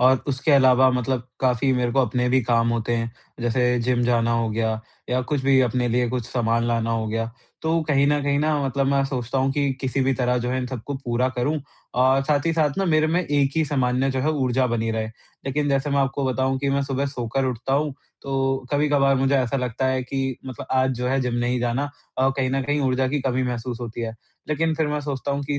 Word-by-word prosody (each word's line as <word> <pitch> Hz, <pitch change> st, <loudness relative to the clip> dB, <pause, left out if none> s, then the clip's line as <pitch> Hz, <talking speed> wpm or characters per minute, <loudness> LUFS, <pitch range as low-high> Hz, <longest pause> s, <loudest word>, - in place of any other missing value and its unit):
और 130 Hz, +1 st, +4 dB
उसके 140 Hz, +3 st, 0 dB
अलावा 130 Hz, -1 st, +6 dB
मतलब 125 Hz, 0 st, -1 dB
काफ़ी 130 Hz, +1 st, +2 dB
मेरे 125 Hz, -2 st, 0 dB
को 135 Hz, -, +3 dB
अपने 125 Hz, 0 st, 0 dB
भी 130 Hz, +1 st, +3 dB
काम 115 Hz, 0 st, +2 dB
होते 115 Hz, 0 st, -1 dB
हैं, 115 Hz, 0 st, -2 dB, 0.3 s
जैसे 125 Hz, +1 st, +1 dB
जिम 125 Hz, 0 st, +1 dB
जाना 115 Hz, -1 st, +2 dB
हो 115 Hz, -1 st, +1 dB
गया 110 Hz, 0 st, -1 dB, 0.3 s
या 125 Hz, +1 st, +2 dB
कुछ 145 Hz, +1 st, -1 dB
भी 135 Hz, -1 st, +5 dB
अपने 125 Hz, 0 st, +1 dB
लिए 120 Hz, +1 st, +1 dB
कुछ 120 Hz, -1 st, -3 dB
सामान 115 Hz, -1 st, 0 dB
लाना 115 Hz, -1 st, 0 dB
हो 115 Hz, -1 st, -1 dB
गया। 115 Hz, +1 st, -2 dB, 0.3 s
तो 160 Hz, +1 st, +1 dB
कहीं 140 Hz, -2 st, +2 dB
न 145 Hz, 0 st, +2 dB
कहीं 140 Hz, 0 st, +1 dB
ना 155 Hz, 0 st, +1 dB
मतलब 135 Hz, +1 st, 0 dB
मैं 140 Hz, 0 st, +2 dB
सोचता 130 Hz, -1 st, -2 dB
हूँ 135 Hz, +1 st, +2 dB
कि 140 Hz, -1 st, +1 dB
किसी 135 Hz, 0 st, -1 dB
भी 135 Hz, +1 st, +2 dB
तरह 125 Hz, -1 st, +1 dB
जो 120 Hz, +1 st, -2 dB
है 130 Hz, -, 0 dB
इन 125 Hz, -, -3 dB
सबको 130 Hz, +2 st, -5 dB
पूरा 125 Hz, -1 st, 0 dB
करूँ 145 Hz, +5 st, 0 dB, 0.4 s
और 130 Hz, +1 st, +4 dB
साथ 145 Hz, +1 st, +1 dB
ही 165 Hz, -, +2 dB
साथ 155 Hz, -3 st, +2 dB
ना 195 Hz, -, +1 dB
मेरे 155 Hz, -2 st, +3 dB
में 170 Hz, +3 st, +1 dB
एक 145 Hz, -4 st, +1 dB
ही 160 Hz, -, +3 dB
समान्य 130 Hz, -2 st, +1 dB
जो 130 Hz, 0 st, -1 dB
है 155 Hz, -, +1 dB
ऊर्जा 130 Hz, -3 st, +1 dB
बनी 115 Hz, -2 st, -1 dB
रहे। 110 Hz, -1 st, -1 dB, 0.4 s
लेकिन 145 Hz, +2 st, 0 dB
जैसे 140 Hz, +1 st, +1 dB
मैं 140 Hz, -, +2 dB
आपको 135 Hz, 0 st, 0 dB
बताऊँ 130 Hz, 0 st, 0 dB
कि 140 Hz, +1 st, -1 dB
मैं 140 Hz, 0 st, +1 dB
सुबह 140 Hz, 0 st, -1 dB
सोकर 130 Hz, 0 st, -2 dB
उठता 130 Hz, +1 st, -2 dB
हूँ, 145 Hz, -1 st, 0 dB, 0.3 s
तो 135 Hz, -1 st, -1 dB
कभी-कभार 145 Hz, -2 st, +3 dB
मुझे 135 Hz, +1 st, +2 dB
ऐसा 130 Hz, 0 st, +1 dB
लगता 125 Hz, 0 st, -1 dB
है 130 Hz, 0 st, 0 dB
कि 135 Hz, 0 st, -2 dB
मतलब 130 Hz, -3 st, -7 dB
आज 130 Hz, 0 st, +2 dB
जो 125 Hz, -, -1 dB
है 135 Hz, +1 st, +1 dB
जिम 125 Hz, -1 st, -1 dB
नहीं 120 Hz, +1 st, 0 dB
जाना 120 Hz, +4 st, -1 dB, 0.3 s
और 130 Hz, +1 st, +3 dB
कहीं 130 Hz, -2 st, 0 dB
न 135 Hz, 0 st, 0 dB
कहीं 145 Hz, +2 st, 0 dB
ऊर्जा 130 Hz, -1 st, +1 dB
की 145 Hz, +1 st, -1 dB
कमी 130 Hz, -1 st, 0 dB
महसूस 125 Hz, -1 st, -3 dB
होती 120 Hz, -1 st, -5 dB
है। 115 Hz, -1 st, -3 dB, 0.3 s
लेकिन 160 Hz, +2 st, +1 dB
फिर 155 Hz, 0 st, 0 dB
मैं 150 Hz, 0 st, -1 dB
सोचता 140 Hz, -1 st, -3 dB
हूँ 140 Hz, -, -2 dB
कि 145 Hz, 0 st, -2 dB
130 Hz, 240 wpm, -23 LUFS, 125-140 Hz, 0.4 s, अलावा